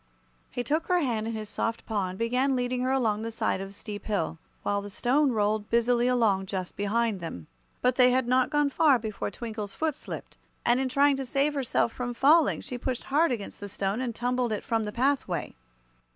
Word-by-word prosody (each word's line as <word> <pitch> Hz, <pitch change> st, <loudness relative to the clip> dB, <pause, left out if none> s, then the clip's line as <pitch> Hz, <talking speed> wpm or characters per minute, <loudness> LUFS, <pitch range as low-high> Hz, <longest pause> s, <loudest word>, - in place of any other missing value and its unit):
He 245 Hz, -, -3 dB
took 310 Hz, +6 st, 0 dB
her 360 Hz, -, +3 dB
hand 235 Hz, -9 st, 0 dB
in 230 Hz, -, -3 dB
his 215 Hz, -1 st, -5 dB
soft 230 Hz, +2 st, -3 dB
paw 205 Hz, -4 st, -1 dB
and 185 Hz, -, -7 dB
began 250 Hz, +4 st, +1 dB
leading 250 Hz, 0 st, -1 dB
her 255 Hz, -, 0 dB
along 225 Hz, -6 st, +1 dB
the 225 Hz, -, -3 dB
side 225 Hz, -4 st, -1 dB
of 195 Hz, -, -5 dB
the -, -, -14 dB
steep 205 Hz, 0 st, -7 dB
hill, 165 Hz, -6 st, -1 dB, 0.2 s
while 200 Hz, 0 st, 0 dB
the 205 Hz, -, -7 dB
Stone 260 Hz, +6 st, +2 dB
rolled 210 Hz, 0 st, 0 dB
busily 240 Hz, +1 st, +3 dB
along 215 Hz, -6 st, +2 dB
just 185 Hz, -2 st, -4 dB
behind 215 Hz, 0 st, 0 dB
them. 160 Hz, -, -6 dB, 0.4 s
But 250 Hz, 0 st, +2 dB
they 250 Hz, -1 st, +7 dB
had 255 Hz, -1 st, +2 dB
not 255 Hz, +1 st, +3 dB
gone 295 Hz, -2 st, +2 dB
far 290 Hz, -2 st, +5 dB
before 220 Hz, -3 st, -4 dB
Twinkle's 215 Hz, -2 st, -6 dB
foot 315 Hz, -3 st, 0 dB
slipped, -, -, -8 dB, 0.3 s
and 240 Hz, +1 st, +4 dB
in 265 Hz, -1 st, 0 dB
trying 280 Hz, +1 st, +4 dB
to 270 Hz, -, -3 dB
save 275 Hz, +4 st, +1 dB
herself 260 Hz, -4 st, 0 dB
from 245 Hz, -1 st, -4 dB
falling 300 Hz, +5 st, +4 dB
she 250 Hz, -2 st, -6 dB
pushed 255 Hz, -1 st, -3 dB
hard 300 Hz, +3 st, +2 dB
against 220 Hz, -5 st, -4 dB
the 205 Hz, -, -6 dB
Stone 195 Hz, +4 st, -2 dB
and 240 Hz, -3 st, -3 dB
tumbled 245 Hz, 0 st, 0 dB
it 210 Hz, -, -2 dB
from 225 Hz, -1 st, 0 dB
the 210 Hz, -, -4 dB
pathway. 270 Hz, +5 st, 0 dB
240 Hz, 215 wpm, -28 LUFS, 210-260 Hz, 0.4 s, they